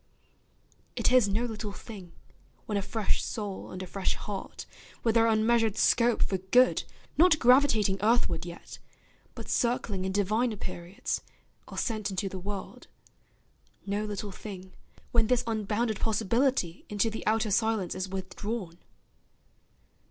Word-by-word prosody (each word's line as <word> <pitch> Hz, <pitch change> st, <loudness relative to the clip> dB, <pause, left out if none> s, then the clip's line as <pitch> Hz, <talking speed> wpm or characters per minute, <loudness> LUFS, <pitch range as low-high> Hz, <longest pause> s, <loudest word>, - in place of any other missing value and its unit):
It -, -, +2 dB
is 250 Hz, -4 st, +6 dB
no 220 Hz, +5 st, +1 dB
little 220 Hz, -2 st, -4 dB
thing, 195 Hz, -6 st, -10 dB, 0.5 s
when 210 Hz, -, -3 dB
a 200 Hz, -, +1 dB
fresh 215 Hz, +1 st, 0 dB
soul 205 Hz, -3 st, -5 dB
And 185 Hz, 0 st, -6 dB
a -, -, -5 dB
fresh 190 Hz, +1 st, -1 dB
heart, 205 Hz, -2 st, -6 dB, 0.4 s
with 225 Hz, -, +3 dB
their 230 Hz, 0 st, +5 dB
unmeasured 225 Hz, -1 st, +3 dB
scope 235 Hz, -1 st, +4 dB
For 190 Hz, -, -1 dB
good, 245 Hz, +8 st, +4 dB, 0.3 s
not 340 Hz, -2 st, +7 dB
gravitating 240 Hz, -7 st, +4 dB
earthward 220 Hz, -6 st, +2 dB
yet, 175 Hz, -1 st, -9 dB, 0.6 s
But -, -, -8 dB
circling 230 Hz, -5 st, 0 dB
in 190 Hz, -, -1 dB
diviner 215 Hz, +4 st, +1 dB
periods, 180 Hz, -1 st, -4 dB, 0.5 s
Are -, -, -9 dB
sent 215 Hz, -4 st, -1 dB
into 195 Hz, 0 st, -2 dB
the 190 Hz, -, -6 dB
world, 195 Hz, +1 st, -6 dB, 1.0 s
no 205 Hz, +1 st, -1 dB
little 205 Hz, -1 st, -4 dB
thing, 190 Hz, -1 st, -9 dB, 0.4 s
When 230 Hz, -2 st, +3 dB
this 250 Hz, 0 st, +2 dB
unbounded 220 Hz, 0 st, -1 dB
possibility 225 Hz, -3 st, +1 dB
Into 210 Hz, +2 st, +1 dB
the 220 Hz, -, -5 dB
outer 220 Hz, 0 st, +2 dB
silence 220 Hz, -3 st, +1 dB
is 185 Hz, 0 st, -4 dB
withdrawn. 190 Hz, -1 st, -5 dB
210 Hz, 135 wpm, -29 LUFS, 190-230 Hz, 1.0 s, not